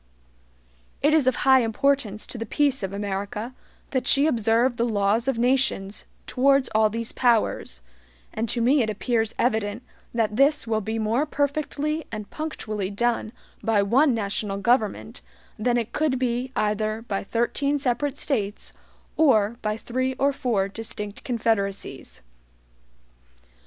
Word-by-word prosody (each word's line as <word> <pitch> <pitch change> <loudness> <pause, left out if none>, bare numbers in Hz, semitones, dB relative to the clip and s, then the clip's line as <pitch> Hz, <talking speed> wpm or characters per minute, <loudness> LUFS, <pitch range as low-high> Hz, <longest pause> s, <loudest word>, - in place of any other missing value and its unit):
It 295 +2 +4
is 305 -5 +3
of 260 - +3
high 265 -1 +7
importance 225 -2 0
to 240 - -8
the 225 - -3
peace 280 +2 +1
of 195 -1 -3
America 200 +3 -4 0.4
that 260 -2 -1
she 280 +1 +5
observe 235 -2 +2
the 235 +1 +1
laws 210 +3 +1
of 270 -3 +1
nations 240 -5 0 0.2
towards 275 0 +3
all 215 0 +4
these 230 +1 -2
powers, 230 - +1 0.5
and 225 +1 -2
to 235 - 0
me 265 +4 +4
it 220 - 0
appears 225 +1 -1
evident 220 -1 0 0.3
that 220 -2 -1
this 285 +1 +3
will 220 -1 0
be 220 +2 -3
more 225 +7 0
perfectly 300 +2 -1
and 215 -2 -6
punctually 215 -11 -4
done 230 +1 -1 0.3
by 220 -3 +2
one 255 +6 +3
national 200 -1 -2
government 225 0 0 0.4
than 240 +2 +1
it 235 -1 -3
could 300 -4 +1
be 250 0 -1
either 215 +1 -1
by 200 -4 -3
thirteen 255 +7 0
separate 280 +1 -1
States 210 -9 -2 0.4
or 235 -7 +3
by 215 0 -1
three 255 +3 -2
or 280 +2 +2
four 235 -8 0
distinct 210 -1 -6
confederacies. 220 - -2
230 Hz, 140 wpm, -24 LUFS, 215-265 Hz, 0.5 s, high